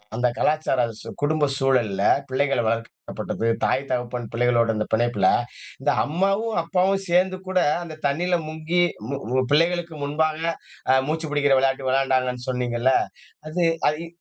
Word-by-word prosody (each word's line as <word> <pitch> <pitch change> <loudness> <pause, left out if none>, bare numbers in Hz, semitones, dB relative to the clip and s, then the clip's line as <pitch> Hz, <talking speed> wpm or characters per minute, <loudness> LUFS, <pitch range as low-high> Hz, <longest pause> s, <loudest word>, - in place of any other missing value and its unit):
அந்தக் 120 +1 0
கலாச்சார 150 -5 +1
சூ - - -9
குடும்ப 150 0 +2
சூழல்ல, 120 -8 +1 0.3
பிள்ளைகள 135 0 +1
வளர்க்கப்பட்டது, 115 0 -3 0.2
தாய் 135 - +1
தகப்பன் 125 -1 -2
பிள்ளைகளோட 115 -1 +2
இந்த 110 - -1
பிணைப்புல, 110 -4 +2 0.5
இந்த 145 +1 +2
அம்மாவும் 195 +7 0
அப்பாவும் 195 +3 +1
சேர்ந்து 185 +2 +2
கூட 185 -1 +1 0.2
அந்தத் 155 -2 -10
தண்ணியில 175 +5 0
முங்கி, 160 +3 -1 0.3
மு 140 - -2 0.2
மு 130 - +3
பிள்ளைகளுக்கு 170 +1 +1
முன்பாக, 155 +2 0 0.5
அ - - +6
மூச்சு 160 0 -2
புடிக்கிற 145 -2 +3
விளையாட்டு 135 0 0
விளையாண்டாங்கன்னு 130 -2 0
சொன்னீங்கல்ல, 125 0 +1 0.6
அது 175 +2 0 0.3
அது 155 +3 -4
140 Hz, 135 wpm, -23 LUFS, 125-165 Hz, 0.6 s, அ